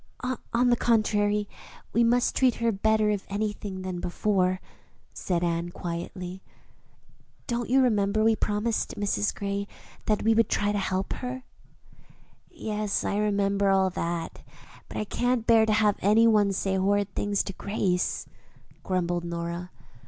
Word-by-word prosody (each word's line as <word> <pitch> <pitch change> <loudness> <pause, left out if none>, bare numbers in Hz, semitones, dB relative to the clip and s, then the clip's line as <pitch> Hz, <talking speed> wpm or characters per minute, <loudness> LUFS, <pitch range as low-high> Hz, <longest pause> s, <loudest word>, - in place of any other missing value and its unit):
"On 245 +1 +3
the - - +5
contrary, 210 -3 +1 0.5
we 235 - +4
must 240 +1 +2
treat 255 -2 +3
her 230 0 +1
better, 215 +1 +2
if 205 -2 -2
anything, 205 -2 -3
than 185 -1 -4
before," 185 +1 0 0.5
said 175 -2 -1
Anne 170 0 -1
quietly. 180 +2 -6 1.0
"Don't 240 -1 -2
you 265 +2 +5
remember 215 -3 +2
we 225 0 +4
promised 215 +2 -1
Mrs. 105 - 0
Gray 200 0 -3 0.4
that 215 -1 +1
we 225 - +4
would 225 -1 +3
try 205 0 +1
to 205 - 0
help 190 0 -1
her?" 255 0 -5 1.1
"Yes, 210 -1 -2
I 200 - 0
remember 200 -1 +1
all 190 -1 +3
that; 170 -1 -4 0.5
but - - -7
I - - 0
can't 245 +2 0
bear 225 -1 +5
to 215 - +3
have 210 -1 +3
any 215 +4 +4
one 210 -3 +4
say 190 0 -1
horrid 200 +1 +1
things 205 -1 0
to 195 - -6
Grace," 185 -2 -1 0.6
grumbled 175 -2 -1
Nora. 170 +1 -4
205 Hz, 145 wpm, -27 LUFS, 185-220 Hz, 1.1 s, the